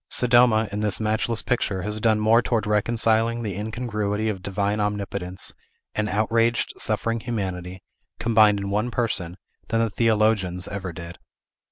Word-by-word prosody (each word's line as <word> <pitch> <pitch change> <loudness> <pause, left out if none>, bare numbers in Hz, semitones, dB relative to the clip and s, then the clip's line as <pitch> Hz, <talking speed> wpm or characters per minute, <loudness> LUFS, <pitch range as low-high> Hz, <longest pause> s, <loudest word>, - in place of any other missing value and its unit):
Sodoma, 120 -3 +4
in 105 - -3
this 105 -2 -1
matchless 110 +1 -1
picture, 100 -6 -1
has 105 +1 -2
done 110 -1 +2
more 110 +2 +4
towards 115 -2 0
reconciling 115 +2 +1
the 100 -4 -3
incongruity 105 -1 -2
of 95 -4 -4
Divine 100 +2 -1
Omnipotence 100 -3 -3 0.4
and 105 0 -1
outraged, 115 +3 +1
suffering 115 0 -1
Humanity, 95 -5 -4 0.4
combined 110 -3 +4
in 100 0 -4
one 105 +4 0
person, 100 -7 -2 0.3
than 115 - 0
the 115 -2 +1
theologians 105 -5 +1
ever 95 -3 -5
did. 85 0 -9
105 Hz, 145 wpm, -24 LUFS, 100-115 Hz, 0.4 s, Sodoma